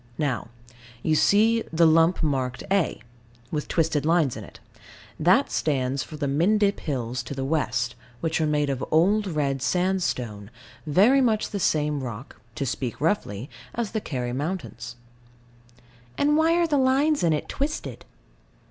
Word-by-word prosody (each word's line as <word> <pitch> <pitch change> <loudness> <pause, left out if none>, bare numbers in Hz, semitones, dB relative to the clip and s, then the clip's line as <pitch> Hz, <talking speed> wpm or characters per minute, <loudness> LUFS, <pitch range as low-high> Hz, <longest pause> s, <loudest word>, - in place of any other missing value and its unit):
Now. 140 -6 -1 0.6
You 160 - +2
see, 220 +8 +4
the 165 +1 +4
lump 165 +2 +4
marked 130 -4 -1
A. 195 -5 +1 0.5
With 150 -2 -3
twisted 160 -3 +1
lines 160 -5 +2
in - - -7
it. - - -14 0.6
That - - +3
stands 135 -2 0
for 155 - -8
the 145 -2 -2
Mendip 200 +8 +2
Hills 125 -4 -3
to 140 - -7
the 135 0 -3
west, 125 -5 0 0.3
which 160 -1 -1
are 155 - +2
made 150 -1 +1
of 135 -1 -3
old 200 +6 +3
red 140 -5 -1
sandstone, 130 - -1 0.4
very 210 - +5
much 220 -4 +1
the 200 - -3
same 150 -4 +1
rock 120 0 -8
(to 145 -2 -2
speak 125 -1 -3
roughly) 135 - -1 0.3
as 230 -3 -2
the 220 - -2
Kerry 125 -7 -3
mountains. 135 -5 -5 1.2
And 295 +1 +3
why 320 +2 +3
are 345 0 +3
the 295 -4 +1
lines 275 +4 +2
in 170 - +3
it 150 - -1
twisted? 295 +3 -4
155 Hz, 155 wpm, -25 LUFS, 135-200 Hz, 1.2 s, very